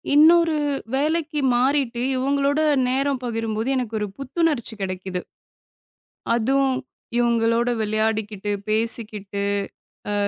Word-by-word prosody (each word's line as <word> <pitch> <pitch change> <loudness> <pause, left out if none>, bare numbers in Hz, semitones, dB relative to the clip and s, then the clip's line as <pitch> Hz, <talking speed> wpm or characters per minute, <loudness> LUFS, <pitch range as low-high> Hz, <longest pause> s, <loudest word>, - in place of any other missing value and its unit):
இன்னொரு 325 +2 +6 0.4
வேலைக்கு 305 +2 0 0.2
மாறிட்டு, 255 -1 +1 0.2
இவங்களோட 280 +2 +1 0.3
நேரம் 270 +1 0
பகிரும்போது 225 0 -2
எனக்கு 240 -4 -2
ஒரு 210 - -2
புத்துணர்ச்சி 275 -3 -1
கிடைக்குது. 185 -1 -3 1.1
அதும், 270 +4 +2 0.5
இவங்களோட 235 0 +2
விளையாடிக்கிட்டு, 215 -1 -1 0.2
பேசிக்கிட்டு, 215 -2 -2 0.7
அ - - 0
240 Hz, 90 wpm, -23 LUFS, 220-275 Hz, 1.1 s, இன்னொரு